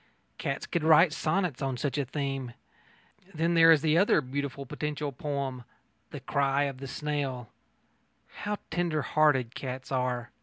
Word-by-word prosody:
Cats 135 0 -3
could 170 - -2
write 160 +1 +6
sonnets 160 -2 -1
on 135 -2 -1
such 140 +1 -2
a 140 - 0
theme.... 135 -2 -3 0.8
Then 165 +2 +1
there 165 -1 +7
is 155 -3 +5
that 155 -1 +3
other 190 -2 +4
beautiful 140 0 -4
potential 150 +2 -3
poem, 135 -2 -4 0.5
The - - -7
Cry 140 0 +1
of 135 -2 -3
the 135 - -6
Snail.... 135 -5 -3 0.9
How 210 0 -3
tender 165 -3 0
hearted 130 -4 +2
cats 130 0 -6
are! 125 -2 -1
140 Hz, 150 wpm, -29 LUFS, 130-155 Hz, 0.9 s, there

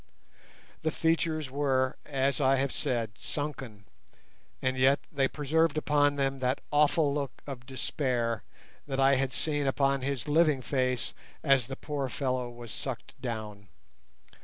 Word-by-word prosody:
The 160 - +1
features 160 -3 0
were, 135 -2 +1
as 140 0 +1
I 135 0 +5
have 135 0 0
said, 120 -6 -1
sunken, 135 -9 -5 0.7
and 130 0 0
yet 130 +2 +4
they 135 -3 +2
preserved 155 +2 +1
upon 145 -1 +3
them 135 -1 0
that 130 +1 +1
awful 150 0 +4
look 140 -2 -4
of 125 -3 -7
despair 125 -3 -1 0.5
that 135 -1 -2
I 135 +1 +6
had 135 0 0
seen 145 0 0
upon 135 0 +2
his 135 -2 -2
living 150 -3 +3
face 130 -2 0 0.3
as 135 -4 +4
the 135 - -5
poor 140 -2 -3
fellow 130 -2 -1
was 120 -2 -9
sucked 130 -1 -5
down. 110 -5 -5
135 Hz, 140 wpm, -30 LUFS, 130-145 Hz, 0.7 s, I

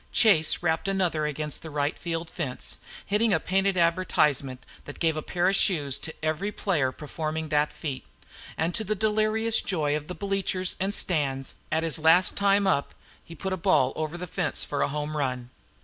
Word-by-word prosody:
Chase 175 -8 +4
rapped 160 +2 0
another 180 -6 0
against 150 0 -3
the 160 - -8
rightfield 160 +3 -2
fence, 145 -6 -4 0.3
hitting 210 +2 +2
a - - +1
painted 195 0 +1
advertisement 150 -7 +1 0.2
that 145 - -9
gave 165 -2 +1
a 155 - -2
pair 175 +3 0
of 195 - +3
shoes 145 -11 +2
to 160 - -7
every 160 +7 -1
player 155 -11 0
performing 155 +2 -4
the 150 0 +2
feat; 150 -3 -5 0.5
and 165 +2 0
to 220 - 0
the 215 +1 -1
delirious 215 +2 +1
joy 150 -6 0
of 150 0 -4
the 180 - -6
bleachers 195 -2 -1
and 195 +2 0
stands, 135 -6 0 0.2
at 160 +1 +1
his 165 0 +2
last 165 +4 +5
time 200 0 +3
up, 170 -7 0 0.3
he 165 - -11
put 190 +4 -4
the 185 - -1
ball 135 -6 +2
over 155 +2 -3
the 180 - -5
fence 175 -1 0
for 145 - -2
a - - +2
home 150 +1 -4
run. 130 -4 -2
165 Hz, 185 wpm, -26 LUFS, 150-190 Hz, 0.5 s, last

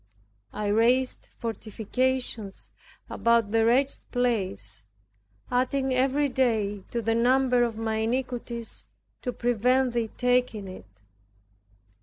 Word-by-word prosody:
I 210 - -4
raised 235 +5 +2
fortifications 230 0 -2 0.4
about 230 -3 +2
the 225 0 +3
wretched 260 +5 +2
place, 205 - -1 0.7
adding 260 +1 +1
every 270 +3 +2
day 220 -6 0
to 235 -1 -3
the 225 +1 +1
number 250 +1 +3
of 230 -2 -2
my 220 -1 -1
iniquities 235 0 -3 0.4
to 250 - -2
prevent 245 +2 +1
Thee 230 -2 -1
taking 245 -5 +1
it. 185 - -10
235 Hz, 105 wpm, -27 LUFS, 220-255 Hz, 0.7 s, the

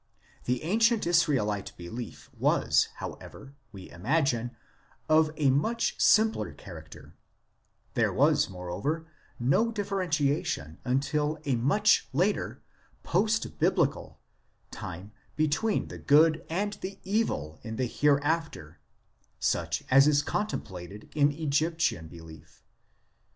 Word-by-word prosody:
The 125 +2 -1
ancient 225 +6 +2
Israelite 125 - +1
belief 110 +7 -8
was, - - +2
however, 135 - -9 0.2
we 95 -4 -10
imagine, 120 - 0 0.5
of 155 0 +4
a 140 -3 +3
much 225 - 0
simpler 220 0 +3
character; 85 -5 -12 0.8
there - - +2
was, - - +3
moreover, 95 - -4 0.3
no 140 - +2
differentiation 155 - -1
until 150 +4 0
a 135 -3 +1
much 175 - +3
later 185 +9 0 0.4
post 220 +1 0
biblical - - 0 0.5
time 95 +5 -8 0.2
between 155 +8 0
the - - -8
good 155 +2 +4
and 200 +5 -1
the 195 +1 -6
evil 190 - -1
in 110 -1 -6
the 130 - 0
Hereafter, 145 - 0 0.6
such - - -1
as 135 +2 +7
is 145 -1 +3
contemplated 100 - -5
in 145 -1 +3
Egyptian 155 - 0
belief. 80 0 -14
145 Hz, 105 wpm, -28 LUFS, 105-170 Hz, 0.8 s, as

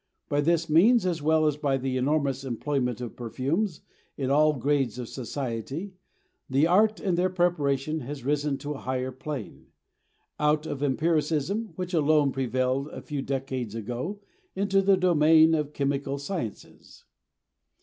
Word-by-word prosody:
By 145 0 +2
this 165 +2 +1
means, 185 +8 +5
as 170 -4 -1
well 155 +1 +3
as 150 -1 +1
by 140 -3 0
the 130 0 -2
enormous 135 0 0
employment 125 -1 -2
of 120 - -6
perfumes 140 - -2 0.4
in 135 -1 -1
all 155 +2 +4
grades 135 -3 0
of 125 -2 -5
society, 135 - -5 0.6
the 135 +4 +3
art 210 +5 +3
of 185 -3 0
their 185 +1 +2
preparation 155 -5 0
has 135 -1 -7
risen 145 0 0
to 145 +2 -6
a 145 - -5
higher 130 0 -2
plane; 130 -2 -7 0.7
out 150 +1 +2
of 145 -3 -5
empiricism, 160 +7 0
which 180 +1 -5
alone 150 -3 +3
prevailed 130 +1 -1
a - - -8
few 145 -3 -4
decades 130 -5 -3
ago, 125 - -4 0.4
into 195 0 +2
the 195 0 +4
domain 160 -3 +5
of 150 -2 +1
the 150 - -23
chemical 140 0 -1
sciences. 140 - -7
145 Hz, 150 wpm, -27 LUFS, 135-165 Hz, 0.7 s, means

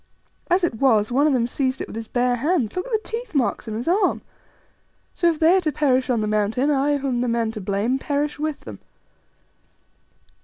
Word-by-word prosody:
As 360 +1 +2
it 345 - +1
was, 225 -5 +3
one 280 +5 +3
of 295 - +2
them 240 -3 +2
seized 260 +1 -2
it - - -3
with - - -10
his 225 0 -6
bare 245 0 +1
hands: 285 - 0
look 365 +5 -3
at - - -10
the 435 -1 -1
teeth 460 -5 -6
marks 255 -3 0
on 215 - -4
his 235 +6 -5
arm. 380 +5 +1 0.9
So 345 - +2
if 325 - -1
they 325 +4 +4
are 380 - +3
to 310 -3 -1
perish 260 -3 +1
on 235 -3 +1
the 215 - -1
Mountain, 215 +7 +1
I, 285 +1 +2
who 275 0 -4
am 245 -2 0
the 250 - 0
man 230 -1 0
to 215 -2 -7
blame, 205 +7 -1
perish 290 +1 -2
with 305 -1 -3
them." - - -10
265 Hz, 225 wpm, -22 LUFS, 235-305 Hz, 0.9 s, they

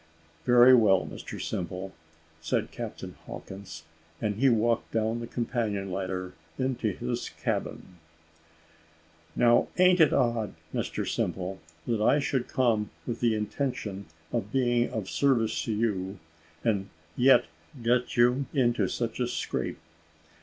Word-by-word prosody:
"Very 125 +1 +7
well, 105 -6 +5
Mr - - -8
Simple," 90 +2 -4 0.5
said 80 - -1
Captain - - -6
Hawkins 95 0 -9 0.4
and 105 - 0
he 135 +3 +4
walked 115 0 +1
down 110 +1 0
the 115 - -5
companion 110 -6 -2
ladder 95 -1 -3 0.2
into 130 -3 -1
his 120 +5 -3
cabin. 90 -2 -4 1.4
"Now 120 -1 +4
a'n't 180 0 +5
it 160 -3 +6
odd, 115 -3 +1 0.2
Mr - - -2
Simple, 95 +1 -2 0.3
that 115 -3 0
I 135 - +4
should 135 -3 -1
come 115 -5 +1 0.2
with 120 -2 -3
the 115 -2 +2
intention 105 -3 -3 0.2
of 105 - -2
being 120 -2 +2
of 110 -6 -4
service 120 -4 +1
to 115 - -2
you, 105 -3 -1 0.5
and 100 -4 0 0.3
yet 130 +2 +5 0.4
get 120 +1 +1
you 125 +3 +4
into 120 -3 +2
such 120 0 -3
a 125 - +1
scrape? - - -3
115 Hz, 130 wpm, -28 LUFS, 100-125 Hz, 1.4 s, Very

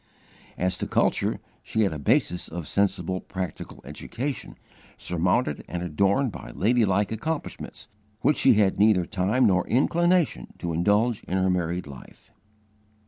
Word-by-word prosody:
'" - - -26
As 90 0 -1
to - - -2
culture, - - +1 0.2
she 110 - -1
had 100 -6 +2
a 75 - -5
basis 85 +4 +1
of 85 -2 -6
sensible 95 -2 0
practical 95 -2 -6
education, 130 +4 -5 0.4
surmounted 90 - 0
and 90 0 -4
adorned 100 - +1
by - - -9
ladylike 105 -2 +2
accomplishments 155 +8 -5 0.3
which 150 - +3
she - - +5
had 100 -2 +2
neither 100 -4 +4
time 100 +9 +1
nor 90 -4 +2
inclination 170 - +1
to 85 -1 -3
indulge 105 +7 +2
in 95 - -1
her 95 0 +2
married 90 0 -1
life. 70 -3 -13
95 Hz, 140 wpm, -25 LUFS, 90-115 Hz, 0.4 s, she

